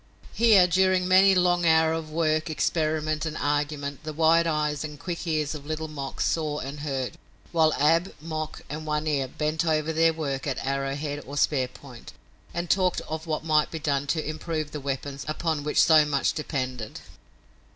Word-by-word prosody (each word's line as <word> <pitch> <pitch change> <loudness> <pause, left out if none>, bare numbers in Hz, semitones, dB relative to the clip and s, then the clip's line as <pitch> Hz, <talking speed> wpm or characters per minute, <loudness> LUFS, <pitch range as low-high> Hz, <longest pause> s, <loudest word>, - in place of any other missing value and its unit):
Here 220 -6 +6
during 185 +1 +2
many 190 +1 +6
a 185 - +3
long 175 -1 +2
hour 160 -1 +4
of 160 -1 -4
work, 155 0 0
experiment 155 -1 0
and 155 -1 -3
argument, 145 0 -2
the 155 0 -5
wide 165 +2 +4
eyes 150 -2 0
and 150 -2 -7
quick 175 0 -5
ears 155 -2 0
of 145 -2 -9
Little 155 0 -3
Mok 140 -3 -6
saw 155 -2 0
and 140 +1 -6
heard, 135 -4 -3 0.3
while 160 -2 +4
Ab, 165 +5 +2
Mok 155 -1 -5
and 155 +2 -6
One 150 0 -1
Ear 140 -4 0
bent 155 +4 -1
over 160 -1 0
their 165 +1 +4
work 145 -4 -3
at 135 -2 -1
arrowhead 140 +2 -2
or 140 +1 -6
spear 135 -3 +2
point, 125 -1 -13 0.4
and 170 +1 -3
talked 185 +1 +2
of 160 +1 -6
what 155 0 -2
might 155 -1 +3
be 165 - -5
done 145 -2 -1
to 155 +1 -1
improve 155 -1 -4
the 150 - -6
weapons 140 0 -4
upon 155 -1 -1
which 150 - 0
so 160 -2 +6
much 145 -2 0
depended. 130 -7 -4
155 Hz, 180 wpm, -26 LUFS, 145-160 Hz, 0.4 s, Here